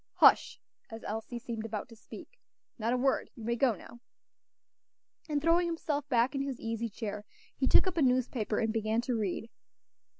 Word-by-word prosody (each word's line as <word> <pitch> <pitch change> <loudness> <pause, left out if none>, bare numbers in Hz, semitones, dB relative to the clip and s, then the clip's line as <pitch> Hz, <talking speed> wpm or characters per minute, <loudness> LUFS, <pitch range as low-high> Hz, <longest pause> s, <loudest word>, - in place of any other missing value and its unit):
Hush!" - - +5 0.3
as 225 0 -8
Elsie 225 +3 -4
seemed 230 -2 -5
about 220 0 -4
to 230 - -12
speak; - - -12 0.4
"not 225 +2 0
a 250 - +2
word. 265 +1 +1
You 230 - -10
may 235 +2 0
go 240 -2 +3
now." 235 +5 -13 1.3
And 295 -1 +1
throwing 335 +3 +3
himself 295 -4 -2
back 245 0 +3
in 275 - -1
his 275 -3 -3
easy 225 0 -3
chair, 210 -1 -5 0.3
he - - 0
took - - +6
up 370 -2 -2
a - - +3
newspaper 250 -4 +1
and 220 -1 +1
began 220 +1 +1
to 245 0 -1
read. 215 +1 -2
235 Hz, 180 wpm, -31 LUFS, 225-270 Hz, 1.3 s, took